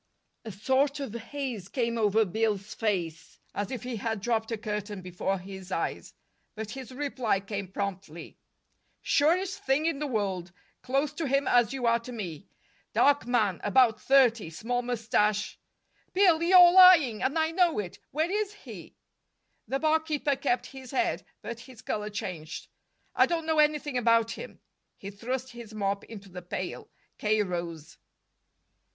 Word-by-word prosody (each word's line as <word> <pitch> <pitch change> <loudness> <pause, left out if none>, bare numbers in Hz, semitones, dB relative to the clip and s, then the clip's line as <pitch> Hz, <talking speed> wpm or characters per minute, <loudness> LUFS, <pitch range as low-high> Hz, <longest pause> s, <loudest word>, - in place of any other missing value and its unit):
A 220 - -5
sort 265 +8 +1
of 270 -6 -5
haze 235 -4 -5
came 235 -3 -1
over 220 -1 +3
Bill's 210 +1 -1
face, 175 -7 -3 0.2
as 205 -1 -3
if 255 - -5
he 250 -2 -4
had 220 0 -2
dropped 225 +1 -1
a 225 - -1
curtain 210 -2 -5
before 185 +2 -2
his 190 0 -10
eyes. - - -3 0.4
But 215 -1 -6
his 265 -1 -8
reply 255 -6 -1
came 200 0 -5
promptly: 190 -4 -6 0.6
"Surest 365 +6 +2
thing 275 +4 +1
in 330 -4 0
the 300 - -2
world. 195 -7 -2 0.3
Close 275 +3 0
to 310 0 -3
him 275 +1 +1
as 240 -2 +4
you 265 -2 -3
are 235 0 +4
to 235 +2 -9
me. 195 -6 -6 0.5
Dark 285 -4 +3
man, 215 -7 +1
about 225 0 +4
thirty, 245 -8 +4
small 245 +9 -2
mustache 215 -3 0 0.3
" - - -40
"Bill, 360 -4 +5
you're 355 0 +8
lying, 350 - +7
and 275 +5 0
I 320 0 +2
know 350 -1 +2
it. 195 -4 -4
Where 315 +5 -1
is 415 0 -1
he?" - - -11 0.7
The 270 - 0
barkeeper 310 -1 +1
kept 255 -2 0
his 265 -2 -11
head, 345 +6 0 0.2
but 235 0 -6
his 240 -1 -13
color 210 0 -3
changed. 170 -6 -6 0.5
"I - - +5
don't 335 -2 -1
know 320 -1 +1
anything 295 -3 +2
about 230 -1 +3
him." - - -9 0.4
He 200 - -8
thrust 250 +5 -4
his 235 -3 -10
mop 200 -1 -1
into 200 -3 -11
the 180 0 -8
pail. 180 +1 -5 0.3
K. 215 0 +2
rose. 170 -4 -6
230 Hz, 160 wpm, -28 LUFS, 205-280 Hz, 0.7 s, you're